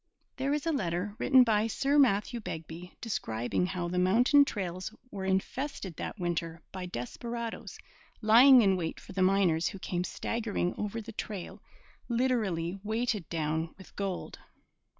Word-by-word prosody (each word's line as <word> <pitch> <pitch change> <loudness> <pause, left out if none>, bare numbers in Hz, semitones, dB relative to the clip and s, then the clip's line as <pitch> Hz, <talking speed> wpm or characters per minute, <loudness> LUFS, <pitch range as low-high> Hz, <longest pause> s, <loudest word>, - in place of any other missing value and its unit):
There 270 +1 0
is 295 +1 -1
a 330 - +2
letter, 190 - -1
written 260 -1 +6
by 220 -2 +2
Sir 280 +6 +2
Matthew 235 -2 +3
Begbie, 165 -2 -7
describing 120 - -1
how 180 -2 -3
the 180 +1 -1
mountain 245 +10 +5
trails 185 -4 -4 0.2
were 190 -1 -5
infested 190 - -2
that - - -5
winter 170 -1 -2
by 185 -1 -5
desperadoes 230 - -5 0.4
lying 245 +3 +8
in 195 -2 +4
wait 170 -3 -3
for - - -12
the 185 - -1
miners 185 -3 +3
who - - -5
came 180 -1 -2
staggering 210 -3 -2
over 210 +2 -3
the 225 +1 -9
trail 205 -2 -6 0.5
literally 210 -8 0
weighted 220 -3 -1
down 160 0 -2
with 190 - -15
gold. 195 -2 -4
195 Hz, 150 wpm, -30 LUFS, 175-230 Hz, 0.5 s, lying